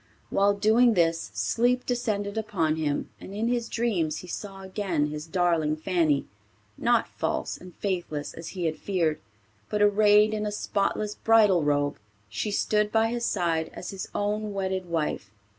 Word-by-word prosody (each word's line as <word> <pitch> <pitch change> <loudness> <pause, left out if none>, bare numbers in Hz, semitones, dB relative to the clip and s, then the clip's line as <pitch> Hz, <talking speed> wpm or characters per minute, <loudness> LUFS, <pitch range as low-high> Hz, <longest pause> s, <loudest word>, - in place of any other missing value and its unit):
While 200 +1 +3
doing 225 +3 +4
this 165 - +1
sleep 240 - +1
descended 215 -5 -1
upon 190 -8 0
him 150 -2 -2
and 195 - -9
in 220 +2 0
his 240 -1 -1
dreams 190 -10 0
he - - -13
saw 195 +1 -7
again 185 -6 -1
his 150 +1 -6
darling 165 -3 +1
Fanny, 155 -3 +1 0.5
not - - +2
false - - -2
and 180 -1 -13
faithless 175 -7 -3
as 165 0 -8
he 175 - -1
had 155 -1 -1
feared, 170 -6 0 0.5
but 210 - -1
arrayed 210 +1 +5
in 210 0 -1
a - - -2
spotless 205 0 -1
bridal 210 -6 +4
robe. 145 -1 0 0.3
She 160 - -3
stood 210 0 +1
by 225 0 +3
his 235 0 -2
side 165 -4 0
as - - -6
his 195 -1 -5
own 210 0 -1
wedded 190 -1 -2
wife. 165 -9 -2
195 Hz, 160 wpm, -27 LUFS, 165-210 Hz, 0.5 s, arrayed